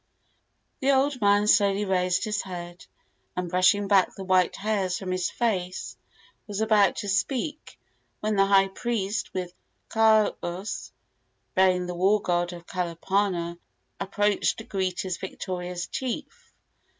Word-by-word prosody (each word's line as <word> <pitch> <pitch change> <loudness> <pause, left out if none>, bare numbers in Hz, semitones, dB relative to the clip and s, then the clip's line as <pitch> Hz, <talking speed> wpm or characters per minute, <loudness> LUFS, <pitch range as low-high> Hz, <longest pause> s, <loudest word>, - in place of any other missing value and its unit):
The 275 +1 +3
old 270 -1 +1
man 205 0 +4
slowly 205 -1 +3
raised 180 -1 +1
his 210 -2 -1
head, 175 -1 -8 0.5
and, 180 -1 -3
brushing 185 +3 +3
back 195 -2 +3
the 195 - -7
white 185 -1 +2
hairs 195 -3 -1
from 190 -2 -5
his 185 -1 0
face, 180 - -2 0.5
was 205 -1 -4
about 215 -2 +4
to 205 - -5
speak, 270 - -2 0.4
when 215 0 -1
the 195 0 +4
high 195 -1 +5
priest, 210 -1 -2
with 180 -2 -4 0.4
kahus 215 -3 +1 0.6
bearing 185 -1 +3
the 180 - -4
war 190 +4 +3
god 175 -2 0
of 175 -1 -10
Kalapana, 175 0 -1 0.4
approached 205 +1 +1
to 225 - -7
greet 190 -5 -2
his 185 -2 -3
victorious 180 -2 -5
chief. 295 - -5
195 Hz, 135 wpm, -26 LUFS, 180-210 Hz, 0.6 s, high